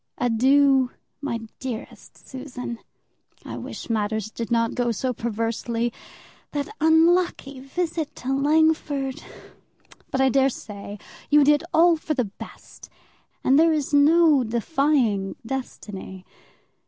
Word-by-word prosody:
Adieu, 265 +2 +3 0.3
my 250 -5 -2 0.2
dearest 250 -4 -7
Susan, 255 -3 -7 0.7
I - - -6
wish - - -7
matters 220 -1 -1
did 230 0 -5
not 230 -1 +1
go 240 -1 0
so 250 +3 -2
perversely. 230 +1 -2 0.6
That 290 +8 -3
unlucky 320 -3 +3
visit 320 +3 -3
to 265 +2 -2
Langford! 290 -2 +1 0.9
but 265 - -2
I 265 0 +4
dare 270 +1 +3
say 205 -4 -8 0.3
you 295 0 +6
did 295 +2 +4
all 335 0 +5
for 310 0 -3
the 250 -3 +1
best, 200 - -12 0.5
and 270 +3 +4
there 325 0 +5
is 300 -1 -2
no 300 -1 +5
defying 235 -4 0
destiny. 205 -7 -6
265 Hz, 115 wpm, -24 LUFS, 230-295 Hz, 0.9 s, you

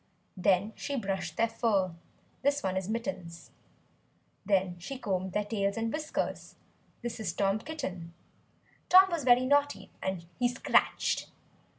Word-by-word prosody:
Then 195 +3 +2
she 285 - -4
brushed 195 -8 -3
their 230 - +3
fur, 200 -6 +1 0.5
(this 285 +1 +1
one 190 -1 -1
is 190 +1 -2
Mittens). 220 -8 -5 0.9
Then 190 -3 +1
she 260 +10 -6
combed 190 -5 -2
their 210 +1 0
tails 200 -1 -1
and 225 0 -1
whiskers 305 0 -3 0.5
(this 240 -1 -4
is 205 -6 -2
Tom 195 +2 +1
Kitten). 190 - -6 0.8
Tom 375 +1 +8
was 335 -4 -1
very 250 0 +5
naughty, 285 -8 +1
and 190 -3 -3
he 245 - +4
scratched. 245 +2 +1
210 Hz, 135 wpm, -30 LUFS, 190-255 Hz, 0.9 s, Tom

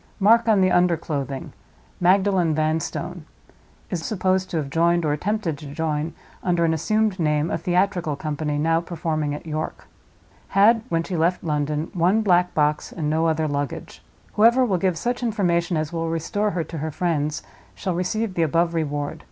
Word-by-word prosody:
Mark 230 +4 +5
on 210 -3 +4
the 185 0 +3
under 175 -1 +3
clothing—'Magdalen 160 - -1
Vanstone.' 155 +1 -2 0.7
Is 170 -2 -2
supposed 185 -2 0
to 170 - -2
have 140 -3 -3
joined, 170 +1 +2
or 150 - +1
attempted 175 -2 -2
to 150 - -9
join, 155 +1 -2 0.3
under 175 -2 +1
an 160 - +2
assumed 215 +4 0
name, 150 0 +1
a - - 0
theatrical 175 -3 0
company 150 0 -3
now 165 +2 +2
performing 155 -3 -2
at 150 - -9
York. 155 0 -5 0.7
Had, 220 +3 +6
when 165 0 0
she 180 - -4
left 170 +2 +1
London, 150 0 -1
one 185 +5 +2
black 180 -3 +3
box, 150 0 +1
and 150 -3 -2
no 160 +1 +2
other 160 -1 +1
luggage. 145 -2 -4 0.3
Whoever 235 +4 +5
will 190 -6 0
give 185 -2 0
such 245 +8 -2
information 175 -7 0
as 155 +1 -3
will 165 -1 -2
restore 165 +6 -1
her 180 -4 -2
to 160 0 -7
her 160 +2 -2
friends 155 -2 -1 0.3
shall 185 - -2
receive 190 +4 -1
the 175 - -1
above 165 +2 +2
Reward. 145 -3 -2
165 Hz, 170 wpm, -23 LUFS, 155-185 Hz, 0.7 s, Had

